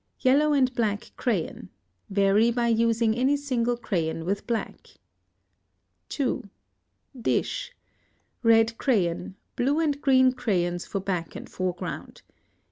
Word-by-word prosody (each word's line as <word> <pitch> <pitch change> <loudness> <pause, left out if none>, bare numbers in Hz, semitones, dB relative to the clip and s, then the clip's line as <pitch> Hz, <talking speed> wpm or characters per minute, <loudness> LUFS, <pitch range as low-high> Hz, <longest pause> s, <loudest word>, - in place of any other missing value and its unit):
Yellow 285 +4 +4
and 260 -3 +2
black 215 -4 -2
crayon. 180 - -2 0.4
Vary 200 +3 +3
by 235 0 0
using 230 -1 +2
any 265 +4 +2
single 245 -4 -1
crayon 165 -7 -2
with 200 +3 -2
black. 230 -2 -3 1.2
2. 255 -7 -2 0.7
Dish. - - -1 0.7
Red 225 -1 +4
crayon, 185 -8 0 0.2
blue 280 +5 +1
and 290 -3 0
green 260 -2 +5
crayons 175 -8 -1
for 200 - -3
back 180 -4 -3
and - - -8
foreground. 180 -1 -5
230 Hz, 115 wpm, -26 LUFS, 195-255 Hz, 1.2 s, green